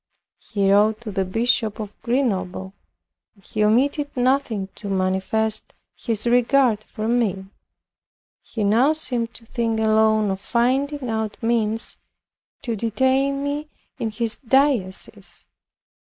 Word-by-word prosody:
He 200 -3 0
wrote 215 +2 +4
to 225 -3 -6
the 195 0 0
Bishop 225 +2 0
of 210 -1 -6
Grenoble; 195 -7 -1 0.6
and 195 - -25
he 215 +4 -2
omitted 280 +7 +2
nothing 245 -6 +1
to 205 - -8
manifest 195 +3 -1 0.2
his 225 -2 -3
regard 245 -2 +3
for 215 0 -5
me. 220 -5 0 1.0
He 220 - -4
now 235 +9 +4
seemed 245 -7 -3
to 230 - -12
think 225 -1 -1
alone 220 -1 +3
of 190 0 -4
finding 265 +4 0
out 220 -2 -2
means 225 -1 +1 0.7
to 235 -4 -2
detain 265 +5 +1
me 290 +2 -3 0.3
in 225 - -1
his 220 +1 -2
diocese. 260 -7 0
225 Hz, 125 wpm, -22 LUFS, 210-250 Hz, 1.0 s, wrote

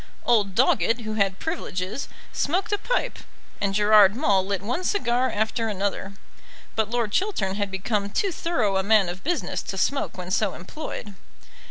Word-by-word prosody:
Old 205 -5 +3
Doggett, 235 -1 +3
who 215 -1 -4
had 195 -3 +1
privileges, 215 - -3 0.3
smoked 360 +8 0
a 410 - +1
pipe, - - -1 0.4
and 195 -1 0
Gerard 210 -1 +6
Maule 205 -8 +3
lit 195 0 -2
one 250 - -2
cigar 255 - +1
after 220 +2 -1
another. 200 -1 -2 0.6
But 220 -2 +1
Lord 235 -3 -1
Chiltern 295 - 0
had 200 0 -2
become 200 +1 -1
too 390 - 0
thorough 245 - 0
a - - +2
man 205 -2 +4
of 180 +2 -7
business 345 +2 -1
to 195 - -6
smoke 275 +5 0
when 180 0 -6
so 205 0 +1
employed. 205 - -7
210 Hz, 165 wpm, -25 LUFS, 195-250 Hz, 0.6 s, Gerard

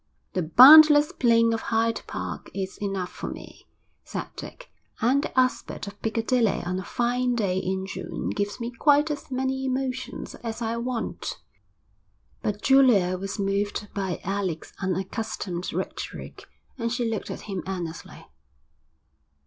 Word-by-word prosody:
'The 185 - 0
boundless 295 - +9
plain 230 -2 +3
of 225 - -2
Hyde 225 0 0
Park - - -5
is 190 -1 -4
enough 195 -3 -2
for - - -6
me,' - - -11 0.4
said - - -5
Dick. - - -10 0.3
'And 260 +5 +3
the - - 0
aspect 255 -4 0
of 200 0 -10
Piccadilly 225 -1 +1
on 180 +1 -2
a - - -5
fine 245 +4 0
day 190 -5 0
in 190 0 -2
June 190 - -5
gives 205 0 -3
me 235 0 -4
quite 295 +4 +3
as 295 - -6
many 265 0 -1
emotions 260 -1 -3
as 225 -1 -4
I 230 -1 -2
want.' 240 0 -4 1.0
But 210 0 -3
Julia 245 -10 +5
was 195 +2 -5
moved 200 +1 -1
by 190 -3 -2
Alec's 190 -4 -3
unaccustomed 190 -1 -3
rhetoric, - - -6 0.3
and 230 0 -1
she 240 -1 -1
looked 225 -2 -3
at - - -6
him 195 -3 -5
earnestly. 175 -4 -6
225 Hz, 140 wpm, -25 LUFS, 195-255 Hz, 1.0 s, boundless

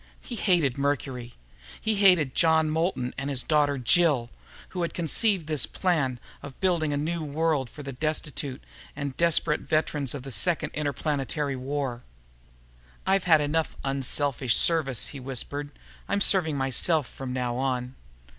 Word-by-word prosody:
He - - -9
hated 170 - +1
Mercury. 130 -4 -2 0.4
He 220 - 0
hated 180 -9 +5
John 160 -2 +3
Moulton 160 -6 -1
and 135 +1 -3
his 130 -3 +1
daughter 145 -2 +2
Jill, 130 -2 +3 0.4
who 185 - -4
had 170 - -2
conceived 180 +2 +2
this 155 -4 0
plan 145 -9 0 0.2
of 140 -2 -10
building 170 -5 +1
a 145 - 0
new 160 +3 -2
world 150 -3 0
for 150 - -10
the 135 -1 -6
destitute 145 -1 -3 0.3
and 140 -2 -4
desperate 165 -2 +2
veterans 150 -4 -1
of 135 - -6
the 135 - -7
Second 155 +10 0
Interplanetary 145 -1 -2
War. 130 -2 -3 1.0
"I've 190 -1 +2
had 160 -4 +5
enough 155 +2 -1
'unselfish 135 -2 +1
service'," 145 -8 +3
he 140 - -8
whispered. 135 +3 -4 0.4
"I'm 200 - +1
serving 175 -7 +3
myself 135 +3 +1
from 130 +1 -7
now 125 -1 -2
on." 125 -1 -2
145 Hz, 145 wpm, -26 LUFS, 130-160 Hz, 1.0 s, hated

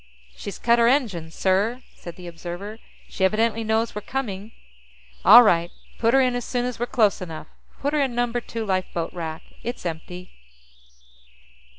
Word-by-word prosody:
"She's 200 - -7
cut 235 0 +3
her 235 - +5
engines, 200 - 0
sir!" 205 +7 +1
said 170 - -10
the 180 - -11
observer. 175 +5 -7 0.3
"She 190 - -4
evidently 225 +3 +2
knows 220 +1 0
we're 210 - -5
coming." 215 -4 -4 0.7
"All 235 +5 +10
right. 170 -5 +3 0.3
Pull 230 +1 +3
her 270 - +6
in 255 -1 +2
as 245 - -2
soon 245 +1 -2
as 250 -2 -4
we're 240 - -1
close 215 -6 +2
enough. 165 -3 -7 0.4
Put 285 +2 0
her 300 - +2
in 260 -4 0
Number 240 0 0
Two 225 -1 -5
lifeboat 185 -4 -2
rack; 165 -1 -5 0.2
it's 240 -4 -5
empty." 180 +2 -6
215 Hz, 170 wpm, -24 LUFS, 180-240 Hz, 0.7 s, All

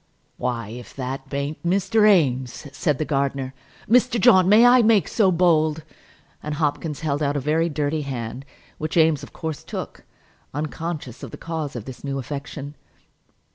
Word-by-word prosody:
"Why, 115 -4 -3
if 120 +2 -10
that 135 0 -5
b'aint 140 +2 -3
Mr. 195 +4 +3
Eames!" 130 - +1
said 150 -6 0
the 155 - -1
gardener. 135 -2 -1 0.3
"Mr. 245 +1 +3
John, 185 -1 +6
may 220 +4 +7
I 245 +1 +7
make 220 -3 +4
so 200 -5 +3
bold!" 160 -3 +2 0.6
and 150 0 -4
Hopkins 150 0 -2
held 150 -2 -1
out 145 0 +1
a - - +1
very 155 +4 +1
dirty 150 0 -1
hand, 130 -2 -5 0.4
which 155 +3 -3
Eames 160 -3 +4
of - - -10
course 160 -2 -5
took, - - -7 0.5
unconscious 150 -3 -4
of - - -7
the - - -9
cause 160 -4 -4
of 115 -3 -6
this 130 -2 -10
new 140 -1 -3
affection. 140 +1 -6
150 Hz, 165 wpm, -23 LUFS, 135-170 Hz, 0.6 s, may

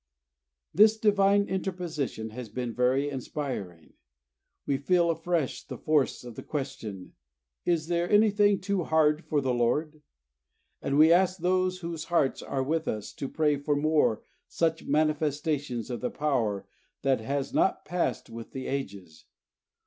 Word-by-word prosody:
This 215 +4 +6
Divine 200 -1 +3
Interposition 170 - -3
has 120 0 -7
been 120 +2 -4
very 130 +4 +2
inspiring. 130 - -5 0.7
We 140 - +1
feel 170 +4 +2
afresh 165 -3 -2
the - - -8
force 150 -5 +1
of 120 -1 -8
the - - -8
question: 130 -10 -6 0.5
"Is 170 -1 0
anything 205 +3 +3
too 190 -1 -1
hard 155 0 +3
for 150 -2 0
the 130 -2 0
Lord?" 150 +6 0 0.8
And 140 - 0
we 160 +2 +7
ask 185 +1 +3
those 185 +1 0
whose 165 -2 -5
hearts 150 -6 +1
are 135 - -2
with 160 +3 -1
us 105 -1 -3
to 135 - -5
pray 150 -2 +1
for 145 +1 0
more 145 -7 +2 0.2
such 160 -1 -1
manifestations 150 -4 0
of 120 - -4
the 125 - -1
Power 120 -9 -1 0.4
that 135 -3 +2
has 135 +4 -3
not - - +1
passed 170 -9 -1
with 115 0 -9
the 130 -1 -5
ages. 100 - -5
150 Hz, 140 wpm, -28 LUFS, 130-170 Hz, 0.8 s, we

